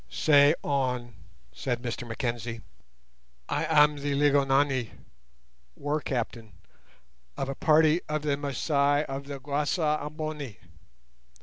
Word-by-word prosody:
"Say 145 - +5
on," 125 -4 -1 0.4
said 120 - -3
Mr 120 0 -4
Mackenzie. 115 -1 -4 0.9
"I 150 - -1
am 150 -1 +4
the 140 0 -2
'Lygonani' 140 -3 +2 0.8
[war 145 +2 -2
captain] 115 -5 -4 0.8
of 135 - -2
a - - -1
party 155 +2 +4
of 150 -1 -2
the 145 -2 +1
Masai 145 0 +1
of 135 +1 -6
the 140 -1 -6
Guasa 150 +3 0
Amboni. 150 - -5
140 Hz, 110 wpm, -27 LUFS, 130-150 Hz, 0.9 s, Say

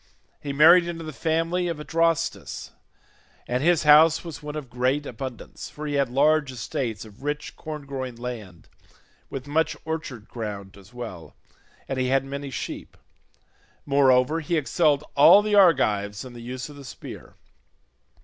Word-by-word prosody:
He 145 - -4
married 170 +5 +7
into 165 -1 -5
the 155 -1 -7
family 165 +4 0
of 165 -3 -3
Adrastus, 165 +1 -1 0.8
and 125 +1 -1
his 170 +1 +3
house 155 +2 +6
was 165 -4 -8
one 150 0 -6
of 150 -3 -5
great 130 +4 0
abundance, 125 -1 -7
for 150 - -8
he 145 - -3
had 140 -3 +1
large 145 +2 +3
estates 115 -2 -4
of 105 +1 -16
rich 145 +1 -4
corn 155 -3 -7
growing 130 -3 -5
land, 110 -9 -8 0.6
with 135 -1 -6
much 155 +3 0
orchard 155 -9 -5
ground 100 -4 -6
as 100 +1 -16
well, 115 -9 -8 0.5
and 135 -1 -3
he 130 - +1
had 135 +1 +2
many 140 +1 -5
sheep; 130 - -6 0.9
moreover 135 +1 +3
he 165 +1 -1
excelled 150 -1 +2
all 195 +8 +8
the 210 0 -1
Argives 110 - +3
in 125 - -10
the 120 - -10
use 125 +2 -6
of 145 -1 -12
the 140 - -10
spear. 130 - -10
140 Hz, 160 wpm, -25 LUFS, 125-155 Hz, 0.9 s, all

